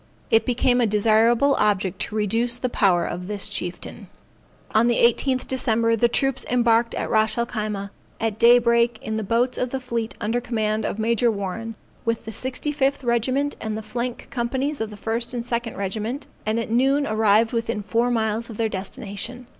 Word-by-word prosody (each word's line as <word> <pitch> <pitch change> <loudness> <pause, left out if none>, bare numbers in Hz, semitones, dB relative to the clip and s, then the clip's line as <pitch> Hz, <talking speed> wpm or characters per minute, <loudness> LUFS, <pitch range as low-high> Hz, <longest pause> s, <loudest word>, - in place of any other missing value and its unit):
It 225 0 +4
became 250 0 +2
a 235 - +3
desirable 225 +6 +4
object 200 -3 +1
to - - -4
reduce 230 +3 0
the 255 0 -2
power 185 -7 +2
of 180 +1 -5
this 205 -1 -2
chieftain. 180 0 -5 0.7
On 220 +2 +4
the 240 - +3
18th 255 +3 +2
December, 230 -3 +1
the 235 +2 +3
troops 270 +2 0
embarked 235 -1 +2
at - - -2
Ras 220 0 +1
el 235 - +1
Khyma, 210 -4 -4 0.3
at 220 -1 -2
day 240 +1 +7
break 235 -1 +2
in 220 0 -3
the 220 - -2
boats 240 +5 +1
of 250 - -1
the 265 - -3
fleet 235 -3 -3
under 230 +3 -1
command 220 -2 -1
of - - -3
Major 230 +1 +2
Warren, 220 +2 -4 0.3
with 230 0 -2
the 220 - -5
65th 270 +3 -1
regiment 255 +4 0
and 220 -1 -3
the 220 - -6
flank 235 +3 -4
companies 265 +4 -2
of 220 - -2
the 210 - -10
first 230 +4 -2
and 235 -1 -3
second 235 -1 -3
regiment, 215 +7 -3 0.2
and 220 +2 +1
at 230 - -4
noon 270 +4 +3
arrived 215 0 +3
within 230 -2 -2
four 235 +4 +1
miles 225 -1 0
of 220 - -8
their 225 -1 0
destination. 210 +4 -6
230 Hz, 185 wpm, -23 LUFS, 215-245 Hz, 0.7 s, day